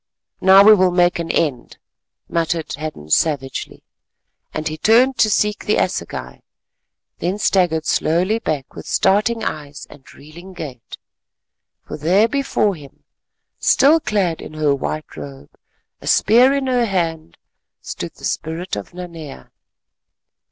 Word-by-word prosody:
"Now 190 +1 +7
we 215 +1 +8
will 185 -3 +4
make 175 -1 +2
an 165 -1 -4
end," 145 -8 -1 0.5
muttered 165 -1 -2
Hadden 145 - -7
savagely, 135 - -1 0.7
and 155 - -4
he 155 - -3
turned 235 +9 +3
to 225 -2 +4
seek 210 0 0
the 210 - +2
assegai, - - -3 0.8
then 180 +4 -2
staggered 175 -6 +1
slowly 180 +8 +1
back 145 - -4
with - - -10
starting 215 +3 +1
eyes 145 -4 -5
and 140 -3 -16
reeling 170 +6 -13
gait. 140 -9 -9 0.9
For - - -6
there 185 +9 +3
before 270 -6 0
him, 145 -5 -14 0.6
still 300 +4 +4
clad 195 - -1
in 155 - -10
her 150 -2 +1
white 155 +2 -5
robe, 70 -1 -10 0.5
a - - -10
spear 245 +5 +5
in 275 -1 -1
her 250 -2 +1
hand, 165 - -3 0.4
stood - - -7
the - - -10
spirit 165 +3 -3
of 105 - -8
Nanea! 165 -5 -9
170 Hz, 135 wpm, -19 LUFS, 155-210 Hz, 0.9 s, we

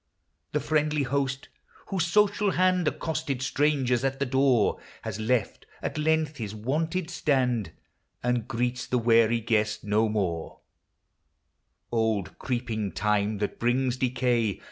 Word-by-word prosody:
The 150 - +2
friendly 150 -1 +1
Host, 135 0 -2 0.4
whose 185 -4 0
social 205 +1 +3
hand 185 -2 +2
Accosted 140 -6 -2
strangers 135 -3 +1
at 135 0 0
the 140 - 0
door, 130 -4 +2 0.2
Has 110 -2 -4
left 115 +2 -1
at - - -4
length 155 -1 +1
his 110 -3 -5
wonted 160 - -2
stand, 125 - +1 0.5
And 125 -2 0
greets 125 0 -2
the 125 - +1
weary 115 0 +4
guest 110 -1 0
no 110 +2 +2
more 90 -6 -2 1.3
Old 110 -6 0
creeping 115 -5 -2
Time, 105 0 +1
that 105 0 -3
brings 125 +1 +1
decay. 120 -4 +1
125 Hz, 125 wpm, -27 LUFS, 110-145 Hz, 1.3 s, weary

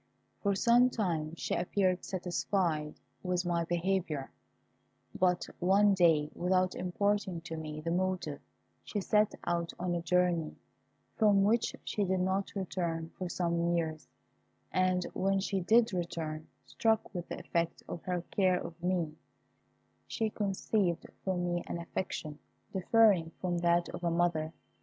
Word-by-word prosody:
For 200 -1 +1
some 240 +5 +5
time 170 -9 -1
she - - -3
appeared 185 0 +1
satisfied 175 -4 -1 0.3
with 180 -1 -1
my 170 -1 0
behaviour; 170 -4 -1 0.8
but 180 -1 +2
one 195 +3 +5
day, 160 -5 +4
without 185 +1 +1
imparting 190 -1 -1
to 165 -1 -6
me 155 -1 -6
the 165 +2 -2
motive, 180 -5 -1 0.4
she 210 - -3
set 210 +2 +2
out 170 -1 -1
on 175 0 -1
a 170 - -1
journey, 175 -2 +1 0.6
from 205 -3 +5
which 225 +3 +2
she 210 - -1
did 190 -1 +1
not 190 +2 -1
return 170 -4 -2
for 185 -1 -3
some 170 -1 0
years, 160 -2 -2 0.6
and 185 -1 +2
when 195 +1 +1
she 195 0 -1
did 225 +4 +4
return, 160 -3 -3 0.2
struck 220 -1 0
with 175 -2 -4
the - - -4
effect 170 0 -2
of 170 - -6
her 180 -2 -2
care 185 -2 +3
of 170 0 -8
me, 175 -3 0 0.9
she 220 -1 -1
conceived 195 -3 0 0.2
for 190 -1 0
me 175 -1 -1
an - - -3
affection 170 -3 -4 0.3
differing 195 -3 +4
from 175 -2 -1
that 170 0 +3
of - - -7
a 170 - +2
mother. 165 -2 +1
180 Hz, 145 wpm, -32 LUFS, 170-195 Hz, 0.9 s, some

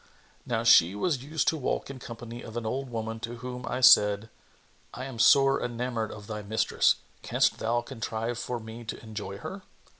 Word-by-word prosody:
Now 115 -1 0
she 95 -5 +6
was 140 - 0
used 155 +2 -1
to 160 - -1
walk 140 0 -2
in 135 - -9
company 120 0 -8
of 115 +1 -8
an 120 - -3
old 130 +4 -3
woman 115 -1 -4
to 115 +1 -5
whom 125 +1 -7
I 125 +1 -2
said, 105 -3 +6 0.6
"I 130 - -5
am 130 -4 -8
sore 135 +3 +5
enamoured 120 -2 -2
of 105 -1 -9
thy 105 0 -5
mistress. 110 +2 +2 0.3
Canst - - +1
thou 120 +2 0
contrive 115 -1 -4
for 120 0 -3
me 110 +1 -9
to 115 - -6
enjoy 105 -3 -6
her?" 190 - -7
115 Hz, 185 wpm, -28 LUFS, 110-125 Hz, 0.6 s, she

